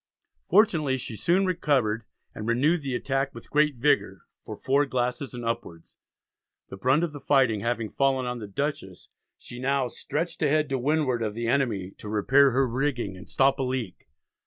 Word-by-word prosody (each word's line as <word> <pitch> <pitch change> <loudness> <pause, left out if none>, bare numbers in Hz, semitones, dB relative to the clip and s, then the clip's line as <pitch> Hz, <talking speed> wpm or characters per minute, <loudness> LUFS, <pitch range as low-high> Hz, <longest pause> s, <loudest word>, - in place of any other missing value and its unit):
Fortunately 165 -9 +3
she 125 -3 -6
soon 180 - +2
recovered, 135 - 0 0.3
and 105 - -6
renewed 145 +8 +2
the 135 -3 -3
attack 135 +1 -1
with 115 - -12
great 150 -1 +3
vigour 140 +5 +1 0.2
"for - - -8
4 140 +2 +1
glasses 125 +1 -2
and 120 -1 -6
upwards." 115 -8 -5 0.7
The 95 - -8
brunt 130 - +2
of 170 - -1
the 145 - -7
fighting 130 -7 +2
having 115 0 -2
fallen 135 -2 +1
on 125 0 -3
the 105 - -7
Dutchess 100 -5 -4 0.3
she 120 - -10
now 135 0 +1
"stretched 165 +7 -4
ahead 155 0 +2
to 135 -1 -1
windward" 135 -3 +1
of 105 -2 -2
the 115 0 -3
enemy, 115 -7 0
to 105 - -8
repair 135 +7 +4
her 135 +1 +2
rigging 125 -5 -2
and 90 -2 -13
stop 135 +1 +2
a - - +1
leak. 125 -7 -4
130 Hz, 180 wpm, -26 LUFS, 115-145 Hz, 0.7 s, repair